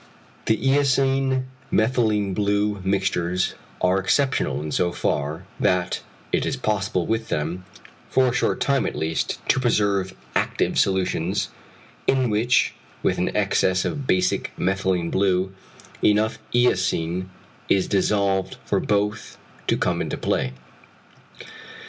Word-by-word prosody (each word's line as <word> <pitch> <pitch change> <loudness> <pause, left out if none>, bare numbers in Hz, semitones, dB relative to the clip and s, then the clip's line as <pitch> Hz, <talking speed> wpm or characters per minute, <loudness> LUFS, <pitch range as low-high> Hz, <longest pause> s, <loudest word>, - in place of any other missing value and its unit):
The 110 - +3
eosine 135 0 +2 0.3
methylene 110 -4 +2
blue 105 0 0
mixtures 95 -2 0 0.3
are 90 +1 +3
exceptional 130 - +1
in 75 +1 -5
so 85 +3 +1
far, 75 +1 -2 0.2
that 90 -3 +1 0.3
it - - +2
is - - -1
possible 100 -4 0
with 110 +2 -1
them, 85 +5 -2 0.4
for 130 - +3
a 125 - +1
short 125 - +1
time 140 -1 +1
at - - -4
least, 80 +1 -2
to - - +4
preserve 100 -6 +1 0.2
active - - +1
solutions, 95 0 +1 0.6
in 130 -3 +2
which 115 +4 +2 0.3
with - - +1
an - - +1
excess 90 -1 +2
of 140 -3 -3
basic 90 0 +1
methylene 95 -2 0
blue, 95 -1 +1 0.5
enough 105 +1 +3
eosin 95 -6 +1 0.4
is 95 - +3
dissolved 100 -1 +1
for - - +1
both 105 0 -1 0.3
to - - +2
come - - 0
into - - -3
play. 65 - -1
100 Hz, 125 wpm, -23 LUFS, 90-110 Hz, 0.6 s, to